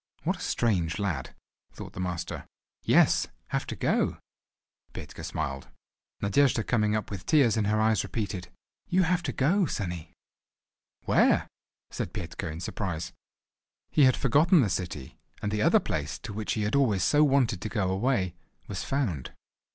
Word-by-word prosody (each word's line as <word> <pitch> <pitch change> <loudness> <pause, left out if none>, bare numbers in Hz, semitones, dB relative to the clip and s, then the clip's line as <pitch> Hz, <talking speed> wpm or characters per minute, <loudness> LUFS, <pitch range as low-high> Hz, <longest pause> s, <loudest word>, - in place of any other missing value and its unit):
"What - - 0
a - - -11
strange 90 -9 0
lad," 85 -10 -3 0.4
thought - - -9
the - - -8
master. 90 -1 -4 0.3
"Yes, - - +4 0.2
have - - -2
to - - -4
go." - - +1 0.8
Petka - - -8
smiled. 70 -1 -4 0.6
Nadejda 115 +3 +3
coming 105 -3 +2
up 110 -1 -3
with 95 -3 -6
tears 135 -8 +4
in 110 -2 +1
her 105 +1 +2
eyes 110 -3 +3
repeated: 100 -5 -4 0.4
"You 185 +1 +3
have 175 +1 +1
to - - -2
go, 170 +7 +2
sonny." 90 - -4 0.9
"Where?" - - +3 0.4
said - - -4
Petka 85 -1 -5
in 80 +2 -7
surprise. 85 -3 -4 0.8
He 145 - +5
had 130 - +4
forgotten 150 - +4
the 105 -6 +1
city; 80 -9 -4 0.2
and 105 - -2
the 105 0 0
other - - +5
place, 75 -1 -3
to 110 -1 -8
which 105 +1 -2
he 110 - -1
had 105 - -1
always 115 -9 +3
so 150 0 +4
wanted 130 -9 +2
to 110 - -3
go 95 -5 0
away—was 95 -3 -2
found. 105 - -2
105 Hz, 160 wpm, -28 LUFS, 90-130 Hz, 0.9 s, He